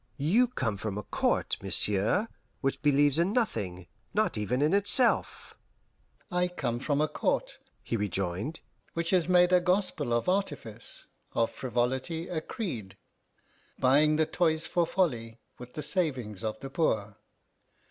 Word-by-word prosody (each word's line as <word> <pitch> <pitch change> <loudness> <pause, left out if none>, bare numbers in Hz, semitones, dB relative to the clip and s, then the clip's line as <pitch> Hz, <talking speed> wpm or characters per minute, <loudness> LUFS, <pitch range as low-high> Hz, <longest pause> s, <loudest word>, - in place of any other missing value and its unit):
"You 195 - +3
come 115 - -2
from 100 0 -4
a 105 - -4
court, - - 0
monsieur, 100 - +2 0.3
which 135 -1 -1
believes 145 0 +3
in 180 +4 +2
nothing, 100 - -1 0.3
not 215 +1 +2
even 115 +6 0
in 155 - +2
itself." 205 +5 +2 0.8
"I 180 0 +2
come 125 -9 -3
from 140 +2 0
a 155 - +2
court," 150 - -1 0.2
he - - -2
rejoined, 100 - -2 0.3
"which 170 0 -1
has 180 -2 +2
made 180 0 +5
a 180 - +6
gospel 180 -7 0
of 120 +5 +1
artifice, 145 - -3 0.3
of 115 - +1
frivolity 130 +7 -2
a 160 -3 -2
creed; 120 - -5 0.8
buying 145 +4 +4
the 160 +1 +3
toys 160 -1 0
for 175 -2 +1
folly 120 -13 -1 0.2
with 125 0 -11
the 150 - -4
savings 130 - -2
of 110 0 -3
the 135 - -7
poor. 110 - 0
145 Hz, 145 wpm, -29 LUFS, 115-175 Hz, 0.8 s, a